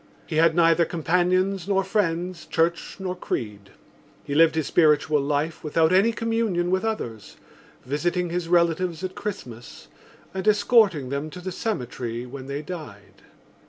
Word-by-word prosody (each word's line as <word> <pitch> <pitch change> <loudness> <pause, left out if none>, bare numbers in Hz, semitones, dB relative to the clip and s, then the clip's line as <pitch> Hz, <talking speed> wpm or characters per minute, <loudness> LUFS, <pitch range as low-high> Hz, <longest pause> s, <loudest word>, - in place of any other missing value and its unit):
He 155 - -3
had 165 0 +4
neither 165 0 +4
companions 180 +3 0
nor 195 -1 +2
friends, 180 -3 -1
church 170 +1 0
nor 185 -1 -3
creed. 105 - -5 0.5
He 145 - -5
lived 160 +2 +5
his 160 -2 0
spiritual 150 -2 +3
life 145 +3 -2
without 160 +2 +2
any 200 +5 +4
communion 225 -6 -1
with 185 +2 +1
others, 120 - -4 0.5
visiting 175 +6 -1
his 175 -1 -2
relatives 170 0 +1
at 185 0 -3
Christmas 125 - -7 0.4
and 190 +2 -4
escorting 205 - +4
them 140 +3 -3
to 180 - -9
the 185 +1 -5
cemetery 125 - -4
when 130 +1 -9
they 140 +2 -4
died. 150 - -9
170 Hz, 145 wpm, -24 LUFS, 145-185 Hz, 0.5 s, lived